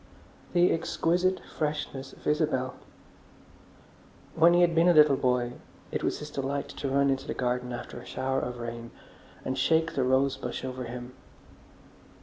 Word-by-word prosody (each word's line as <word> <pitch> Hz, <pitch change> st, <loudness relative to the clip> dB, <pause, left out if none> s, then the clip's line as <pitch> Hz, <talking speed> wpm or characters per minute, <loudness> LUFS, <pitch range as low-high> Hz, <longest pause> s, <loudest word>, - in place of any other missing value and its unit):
The 175 Hz, 0 st, +5 dB
exquisite 175 Hz, +3 st, +1 dB
freshness 150 Hz, -3 st, -4 dB
of -, -, -17 dB
Isabel! 150 Hz, -4 st, +1 dB, 1.6 s
When 170 Hz, +2 st, +5 dB
he 175 Hz, -, +5 dB
had 175 Hz, -1 st, +4 dB
been 165 Hz, +1 st, +4 dB
a 175 Hz, -, +5 dB
little 150 Hz, -2 st, +7 dB
boy, 125 Hz, -2 st, +1 dB, 0.4 s
it -, -, -2 dB
was -, -, 0 dB
his 150 Hz, 0 st, -8 dB
delight 140 Hz, 0 st, -3 dB
to 140 Hz, -, -4 dB
run 140 Hz, +1 st, +3 dB
into 135 Hz, -, -2 dB
the -, -, -3 dB
garden 125 Hz, 0 st, -1 dB
after 120 Hz, 0 st, -6 dB
a -, -, -12 dB
shower 130 Hz, 0 st, -1 dB
of 125 Hz, -1 st, -4 dB
rain 115 Hz, 0 st, -6 dB, 0.6 s
and 130 Hz, -, -1 dB
shake 160 Hz, +5 st, +2 dB
the 135 Hz, -, +1 dB
rose 130 Hz, +1 st, +2 dB
bush 125 Hz, +1 st, -5 dB
over 130 Hz, -1 st, -5 dB
him. 120 Hz, +1 st, -7 dB
135 Hz, 160 wpm, -28 LUFS, 125-155 Hz, 1.6 s, little